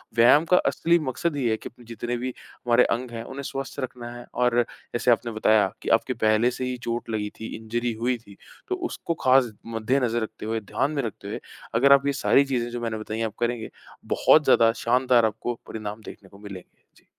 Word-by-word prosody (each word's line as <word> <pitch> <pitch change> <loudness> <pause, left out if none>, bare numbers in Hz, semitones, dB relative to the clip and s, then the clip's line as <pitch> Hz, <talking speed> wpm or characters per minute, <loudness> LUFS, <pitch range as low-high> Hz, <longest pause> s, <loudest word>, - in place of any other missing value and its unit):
व्यायाम 120 +7 +6
का 180 +2 +4
असली 170 +1 +2
मकसद 145 +3 -2
ही 135 - -1
है 110 - +1
कि - - -8 0.2
जितने 120 +2 -4
भी 125 +1 -4 0.2
हमारे 120 0 +3
अंग 120 +1 -2
हैं, 115 -1 -5
उन्हें 140 +3 -7
स्वस्थ 135 +1 -5
रखना 125 -2 -5
है 120 - -10
और 125 -1 +2 0.3
जैसे 120 +1 +2
आपने 115 0 +1
बताया 110 -2 +3
कि - - -4
आपकी 130 - -5
पहले 110 +3 +3
से 130 +1 -4
ही 125 0 -3
चोट 115 0 -3
लगी 105 -2 -2
थी, 110 - -6
इंजरी 120 +1 -2
हुई 125 +1 +1
थी, 100 -4 -17 0.3
तो 375 - -1
उसको 170 - -3
ख़ास 130 -2 +5
मद्देनज़र 115 +1 0
रखते 110 0 -7
हुए, 110 +1 -1
ध्यान 140 +8 -1
में 145 - -1
रखते 110 - -6
हुए, - - -4 0.4
अगर 140 +4 +6
आप 140 0 +4
ये 140 - +2
सारी 140 - +5
चीजें 125 -3 -1
जो 120 0 -5
मैंने 115 -1 -2
बताई 110 0 -5
हैं, 115 - 0
आप 110 - -5
करेंगे, 120 -1 -1 0.5
बहुत 155 - +5
ज़्यादा 115 -4 +5
शानदार 125 -1 +4
आपको 115 +2 -3
परिणाम 105 0 -6
देखने 95 - -11
को 100 - -16
मिलेंगे। 100 -3 -11
जी। - - -25
120 Hz, 215 wpm, -25 LUFS, 110-130 Hz, 0.5 s, व्यायाम